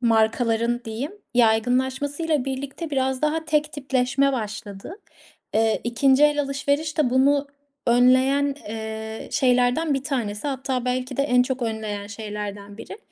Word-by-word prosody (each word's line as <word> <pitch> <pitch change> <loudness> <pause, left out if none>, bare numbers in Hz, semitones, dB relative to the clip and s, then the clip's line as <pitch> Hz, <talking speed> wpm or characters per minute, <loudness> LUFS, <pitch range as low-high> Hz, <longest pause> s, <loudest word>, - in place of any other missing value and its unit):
markaların 230 +1 +2
diyeyim 230 - -4 0.2
yaygınlaşmasıyla 260 +6 +1
birlikte 275 +4 -5
biraz 265 0 0
daha 320 +1 0
tek 300 0 0
tipleşme 270 -1 +1
başladı. 215 - -6 0.6
Eee, 220 0 +2
2'nci 265 +4 +4
el 295 0 +3
alışveriş 285 +3 -1
de 265 -5 +3
bunu 280 +2 +3 0.4
önleyen, 260 +4 +4
eee, 220 0 -6
şeylerden 255 +3 +2
1 270 0 -2
tanesi. 235 -5 -2
Hatta 260 -2 -2
belki 255 +1 -2
de 275 - +2
en 250 -3 +4
çok 255 0 -3
önleyen 215 -3 -3
şeylerden 205 -1 -7
biri. 395 - -9
255 Hz, 130 wpm, -23 LUFS, 225-280 Hz, 0.6 s, 2'nci